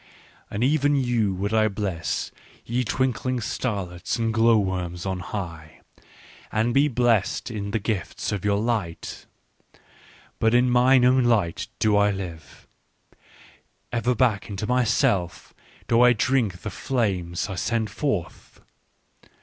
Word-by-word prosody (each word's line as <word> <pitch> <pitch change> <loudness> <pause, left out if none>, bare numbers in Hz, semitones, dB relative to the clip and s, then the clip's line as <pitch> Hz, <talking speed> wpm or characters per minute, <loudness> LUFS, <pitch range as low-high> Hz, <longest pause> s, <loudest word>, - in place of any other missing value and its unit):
" - - -30
And 105 +3 -2
even 145 +1 +3
you 120 -7 +1
would 100 +3 -2
I 110 -1 +4
bless, 95 -5 -3 0.3
ye 125 +2 -1
twinkling 130 +1 -1
star 105 -3 -2
lets 90 +1 -4
and 115 -1 0
glow 115 +1 +4
worms 90 -3 -2
on 95 -1 -2
high! 85 -5 -7 0.7
and 115 +2 +1
be 140 +2 +4
blessed 120 -5 +1
in 100 -2 -4
the 100 - 0
gifts 105 -3 -3
of 100 -3 -3
your 100 0 +2
light. 105 -6 -3 0.6
" - - -27
But 110 +1 +3
in 125 0 +4
mine 125 +1 +5
own 130 0 +4
light 105 -8 +1
do 105 -1 +2
I 105 0 +4
live, 85 -7 -7 1.3
ever 120 +1 0
back 115 -4 +1
into 100 +1 -4
myself 105 -7 0 0.3
do 115 +1 +4
I 125 0 +7
drink 115 -6 0
the 110 - -4
flames 95 -9 -1
I 100 - -5
send 110 +3 -1
forth. 105 - -4
110 Hz, 140 wpm, -24 LUFS, 95-120 Hz, 1.3 s, I